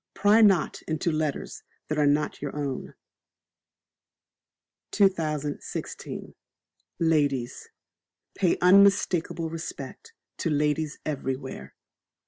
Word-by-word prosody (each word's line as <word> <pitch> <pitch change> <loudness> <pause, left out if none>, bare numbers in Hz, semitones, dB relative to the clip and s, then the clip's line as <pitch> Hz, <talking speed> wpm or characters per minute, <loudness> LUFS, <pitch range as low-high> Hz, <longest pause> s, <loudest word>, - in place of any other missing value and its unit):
Pry 205 +3 +5
not 195 -7 +3
into 160 +1 -1
Letters 155 -2 -3 0.3
that 155 0 -1
are 145 - +4
not 145 +1 0
your 145 -1 -5
own. 140 -3 -4 1.9
2016. 155 -7 -2 0.6
Ladies. 145 -7 0 0.6
Pay 180 -4 +1
unmistakable 180 -3 +4
Respect 175 - -7 0.3
to 170 - 0
ladies 150 0 0
everywhere. 130 - -4
155 Hz, 85 wpm, -26 LUFS, 145-180 Hz, 1.9 s, Pry